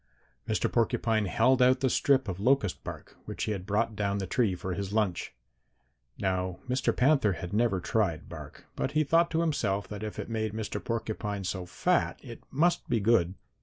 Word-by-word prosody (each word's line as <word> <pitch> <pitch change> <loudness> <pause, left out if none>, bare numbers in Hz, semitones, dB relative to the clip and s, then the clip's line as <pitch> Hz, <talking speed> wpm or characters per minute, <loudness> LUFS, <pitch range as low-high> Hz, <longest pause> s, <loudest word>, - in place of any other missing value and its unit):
Mr. 110 - +1
Porcupine 115 -2 +1
held 130 +7 +3
out 130 +1 +5
the 135 - +3
strip 135 -2 +2
of 95 -1 -4
locust 120 -3 +1
bark - - -8
which - - -4
he - - -1
had 95 -2 -4
brought 110 +2 0
down 100 -1 0
the 95 - -2
tree 100 0 +1
for 90 +1 -4
his 100 +1 -4
lunch. 105 -5 0 0.9
"Now 95 -2 -1
Mr. 125 +1 0
Panther 135 -6 +4
had 85 +2 -6
never 110 -3 +2
tried 95 -4 -1
bark, - - -10
but 135 - -2
he 155 0 +3
thought 165 +4 +3
to 165 0 0
himself 105 -12 0
that 105 -1 -6
if 110 -1 -5
it - - -4
made 110 -2 -2
Mr. 110 -1 -4
Porcupine 110 -3 -3
so 90 -1 -3
fat - - 0
it - - -9
must 170 +6 +1
be 120 - +2
good. 100 -4 +3
110 Hz, 190 wpm, -29 LUFS, 95-125 Hz, 0.9 s, out